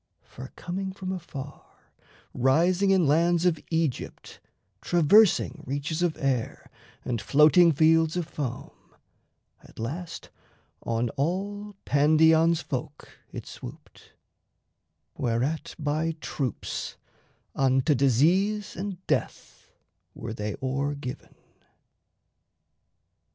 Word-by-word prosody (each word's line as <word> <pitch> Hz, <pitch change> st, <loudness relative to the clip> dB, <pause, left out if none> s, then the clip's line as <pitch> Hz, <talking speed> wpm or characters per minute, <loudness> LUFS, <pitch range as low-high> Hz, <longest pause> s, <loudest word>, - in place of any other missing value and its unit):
For 130 Hz, +1 st, -11 dB
coming 190 Hz, +2 st, -4 dB
from 190 Hz, -1 st, -5 dB
afar, 145 Hz, -6 st, -7 dB, 0.7 s
Rising 170 Hz, +10 st, +2 dB
in 190 Hz, -3 st, +4 dB
lands 170 Hz, +4 st, +3 dB
of 165 Hz, -4 st, +2 dB
Aegypt, 160 Hz, -6 st, -3 dB, 0.4 s
traversing 175 Hz, -1 st, +4 dB
Reaches 145 Hz, +4 st, -3 dB
of 175 Hz, -3 st, 0 dB
air 135 Hz, -6 st, -2 dB, 0.3 s
and 120 Hz, -3 st, -2 dB
floating 150 Hz, -, +5 dB
fields 160 Hz, +2 st, +3 dB
of 175 Hz, -, -1 dB
foam, 130 Hz, -7 st, -5 dB, 0.9 s
At -, -, -19 dB
last 160 Hz, +10 st, -6 dB, 0.5 s
on 115 Hz, +1 st, -1 dB
all 200 Hz, -, -3 dB
Pandion's 160 Hz, +3 st, +4 dB
folk 145 Hz, +2 st, -6 dB, 0.2 s
it -, -, -7 dB
swooped; -, -, -12 dB, 1.0 s
Whereat 135 Hz, +8 st, -2 dB
by 155 Hz, +1 st, -1 dB
troops 130 Hz, -7 st, -4 dB, 0.6 s
unto 135 Hz, +2 st, +2 dB
disease 170 Hz, -, +2 dB
and 190 Hz, 0 st, -6 dB
death -, -, -3 dB, 0.5 s
Were 110 Hz, -1 st, -6 dB
they 105 Hz, -2 st, -4 dB
o'er 140 Hz, +2 st, -1 dB
given. 130 Hz, -3 st, -8 dB
155 Hz, 95 wpm, -26 LUFS, 135-175 Hz, 1.0 s, floating